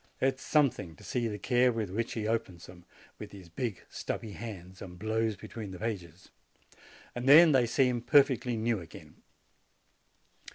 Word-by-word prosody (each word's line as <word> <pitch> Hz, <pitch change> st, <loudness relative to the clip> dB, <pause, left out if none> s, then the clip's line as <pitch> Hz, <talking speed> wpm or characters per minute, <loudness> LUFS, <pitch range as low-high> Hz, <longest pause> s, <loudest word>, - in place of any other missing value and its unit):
It 130 Hz, 0 st, +1 dB
is -, -, -14 dB
something 135 Hz, -, +1 dB
to -, -, -17 dB
see 120 Hz, -2 st, -1 dB
the 105 Hz, -2 st, -4 dB
care 125 Hz, +4 st, +2 dB
with 110 Hz, -5 st, -3 dB
which 115 Hz, +4 st, -2 dB
he 110 Hz, -2 st, -3 dB
opens 110 Hz, -7 st, -3 dB
them, 90 Hz, -1 st, -14 dB, 0.3 s
with 105 Hz, -, -8 dB
his 95 Hz, -4 st, -12 dB
big, 105 Hz, +4 st, -4 dB
stubby 110 Hz, -, -5 dB
hands, 95 Hz, -4 st, -9 dB
and 90 Hz, -2 st, -9 dB
blows 110 Hz, +2 st, -1 dB
be -, -, -11 dB
tween 110 Hz, -4 st, -7 dB
the 95 Hz, -, -8 dB
pages: 95 Hz, -4 st, -6 dB, 0.9 s
then 145 Hz, +7 st, +7 dB
they 130 Hz, -4 st, +3 dB
seem 125 Hz, 0 st, +1 dB
perfectly 125 Hz, -2 st, +3 dB
new 110 Hz, -1 st, 0 dB
again. 85 Hz, -3 st, -13 dB
110 Hz, 165 wpm, -30 LUFS, 95-125 Hz, 0.9 s, then